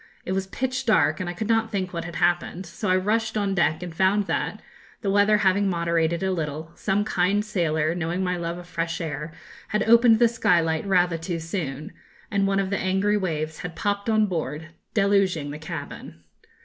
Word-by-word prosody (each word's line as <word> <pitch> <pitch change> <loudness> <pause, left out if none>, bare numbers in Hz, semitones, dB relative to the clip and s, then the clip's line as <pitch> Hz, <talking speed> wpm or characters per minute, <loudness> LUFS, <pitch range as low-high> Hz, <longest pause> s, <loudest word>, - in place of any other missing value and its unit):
It - - -3
was 190 0 -1
pitch 255 +4 -3
dark, 155 -8 +3
and 180 - -3
I - - -3
could 215 +4 -3
not 225 -1 +2
think 185 -3 -3
what 170 -1 -4
had 170 -1 -7
happened; 175 +2 0
so 170 +4 -4
I 185 - +4
rushed 215 +4 0
on 200 -2 0
deck, 170 -2 +1
and 175 -2 -6
found 190 +4 +2
that, - - -2 0.4
the 195 - 0
weather 205 +1 +4
having 200 0 +2
moderated 170 0 0
a 190 - +1
little, 160 -2 -4
some 200 +2 0
kind 200 +2 +1
sailor, 160 -6 0
knowing 175 +2 -2
my 180 0 0
love 170 0 -3
of 175 - -9
fresh 165 -1 -3
air, 155 -1 -4 0.4
had 210 - 0
opened 235 0 +6
the 235 +1 +5
skylight 170 -7 +1
rather 180 -3 +2
too 170 +1 -3
soon; 160 -3 -5 0.4
and 200 -1 +2
one 195 0 +1
of 195 0 -1
the 200 - 0
angry 195 +2 +1
waves 160 -5 -2
had 175 -2 -6
popped 205 +1 -1
on 215 -1 +4
board, 160 -4 -4 0.3
deluging 195 -7 +2
the 150 - -7
cabin. 85 - -8
180 Hz, 200 wpm, -24 LUFS, 165-200 Hz, 0.4 s, opened